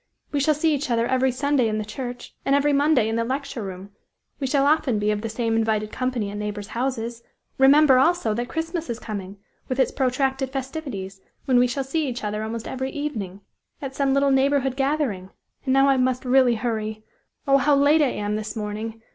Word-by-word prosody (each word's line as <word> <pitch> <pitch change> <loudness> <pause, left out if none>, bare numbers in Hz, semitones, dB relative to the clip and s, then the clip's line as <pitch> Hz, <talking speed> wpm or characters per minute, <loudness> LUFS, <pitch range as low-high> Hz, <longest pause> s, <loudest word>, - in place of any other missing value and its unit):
We 290 - 0
shall 300 +2 +3
see 310 +1 +2
each 290 0 -2
other 230 -1 +2
every 260 +1 +2
Sunday 275 -1 +1
in 215 -1 -1
the 215 - -3
church, 245 +3 -7
and 275 - +2
every 285 +1 +2
Monday 280 -5 +3
in 225 +1 -1
the 230 - +1
lecture 260 0 -3
room. 190 0 -7 0.5
We 270 - -1
shall 275 +1 +2
often 290 -6 +2
be 210 0 +1
of 210 0 -2
the 225 - -4
same 225 0 -1
invited 215 -1 0
company 250 -5 -2
at 205 - -6
neighbors' 210 -1 -5
houses. 235 -2 -3 0.4
Remember, 270 0 +6
also, 320 -6 +2
that 240 +3 -3
Christmas 330 -1 -3
is 235 - -2
coming, 200 -4 -6 0.3
with 255 +1 -3
its 260 - +3
protracted 265 0 0
festivities, 260 -8 -5 0.2
when 255 -2 +4
we 250 - +4
shall 270 +3 -2
see 295 +3 -1
each 245 -2 -4
other 210 0 -2
almost 225 +1 -4
every 265 0 -3
evening, 215 -11 -5 0.4
at 270 -2 -6
some 275 0 +1
little 275 0 +3
neighborhood 270 -1 +2
gathering. 270 -9 -1 0.4
And 260 - +2
now 270 0 +5
I 270 -1 +4
must 255 0 0
really 250 -1 +4
hurry; 220 -2 -3 0.4
oh! 275 0 +6
how 285 +2 +3
late 290 +3 +4
I - - +5
am 210 -2 -2
this 215 +1 -5
morning! 220 +1 -5
255 Hz, 205 wpm, -24 LUFS, 220-275 Hz, 0.5 s, Remember